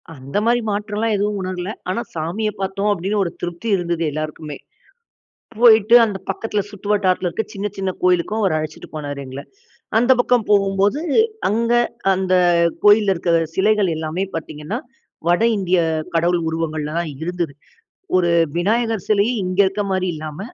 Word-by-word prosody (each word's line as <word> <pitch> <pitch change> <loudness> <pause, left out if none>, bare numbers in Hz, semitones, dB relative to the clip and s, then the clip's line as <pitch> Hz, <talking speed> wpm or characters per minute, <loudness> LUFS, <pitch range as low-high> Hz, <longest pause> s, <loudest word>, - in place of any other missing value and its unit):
அந்த 135 +6 -5
மாதிரி 240 +1 +3
மாற்றம்லாம் 210 +2 -1
எதுவும் 205 0 -1
உணரல. 185 0 -4 0.2
ஆனா 225 +6 -1
சாமிய 175 +7 -2
பார்த்தோம் 200 +2 0
அப்படின்னு 200 +3 -1
ஒரு 170 - -3
திருப்தி 175 +5 -5
இருந்தது 170 -2 -2
எல்லாருக்குமே. 155 0 -5 1.0
போயிட்டு 225 -1 +6
அந்த 205 -3 -3
பக்கத்தில 210 +1 -2
சுற்றுவட்டாரத்தில 200 -3 0
இருக்கிற 205 +5 -4
சின்ன 200 +1 -3
சின்ன 190 -1 -2
கோயிலுக்கும் 180 +4 +2
அவர் 185 -5 +2
அழைச்சிட்டு 155 0 -6
போனாரு 145 -2 -5
எங்கள. 130 +2 -7 0.6
அந்த 245 +3 +4
பக்கம் 245 -2 +2
போகும்போது 200 +5 +2 0.5
அங்க 230 +3 +1 0.4
அந்த 185 0 0 0.5
கோயில்ல 205 -1 +6
இருக்கிற 170 -1 0 0.2
சிலைகள் 205 -1 +2
எல்லாமே 160 +4 -2
பார்த்திங்கன்னா, 155 +5 -5 0.5
வட 175 +5 +3
இந்திய 185 -2 +1 0.4
கடவுள் 170 +1 +2
உருவங்கள்ல 155 -2 -3
தான் 170 -3 -2
இருந்தது. 175 -3 -2 0.6
ஒரு 175 -2 +3 0.3
விநாயகர் 225 +3 0
சிலைய 215 +3 +3
இங்க 185 +1 -3
இருக்கிற 200 +2 -1
மாதிரி 185 0 0
இல்லாம, 155 0 -7
190 Hz, 140 wpm, -20 LUFS, 170-210 Hz, 1.0 s, போயிட்டு